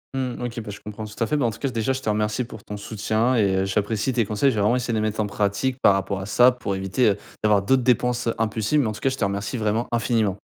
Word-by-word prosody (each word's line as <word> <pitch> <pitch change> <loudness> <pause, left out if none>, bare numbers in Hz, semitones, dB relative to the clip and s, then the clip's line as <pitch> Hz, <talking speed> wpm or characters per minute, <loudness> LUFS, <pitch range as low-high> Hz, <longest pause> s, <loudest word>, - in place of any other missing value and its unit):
Mmh 130 -2 -3
OK. 120 -1 -4
Bah, 110 - -9
je 105 - -7
comprends 105 +1 -7
tout 105 +2 -4
à - - +2
fait. 130 +7 0
Bah, 140 - +1
en 115 - +1
tout 110 - -10
cas, 135 - -1
déjà, 115 0 -1
je 130 - -4
te 110 - -2
remercie 105 +3 0
pour 110 -3 -11
ton 105 - -7
soutien 110 +4 0
et 100 -5 +2
heu, - - 0
j'apprécie 105 +5 -1
tes 115 -2 +2
conseils. 110 +7 +2
Je - - -4
vais 105 - 0
vraiment 105 +4 +3
essayer 125 -1 -1
de - - +1
les - - 0
mettre 110 0 -2
en 105 - -1
pratique 105 +5 -1
par 100 - +6
rapport 95 0 -2
à 95 - -6
ça 125 +4 +6
pour 110 -5 -4
éviter, 95 +6 +1
heu, 100 - +1 0.3
d'avoir 105 -2 +3
d'autres 130 +5 +3
dépenses, 125 0 +1
heu, 115 - 0
impulsives. 110 +5 +1
Mais 125 - 0
en - - -1
tout 105 - -9
cas, 135 - +2
je 130 - -4
te - - -2
remercie 100 +4 -2
vraiment 110 +1 0
infiniment. 110 -4 +1
110 Hz, 310 wpm, -23 LUFS, 105-125 Hz, 0.3 s, par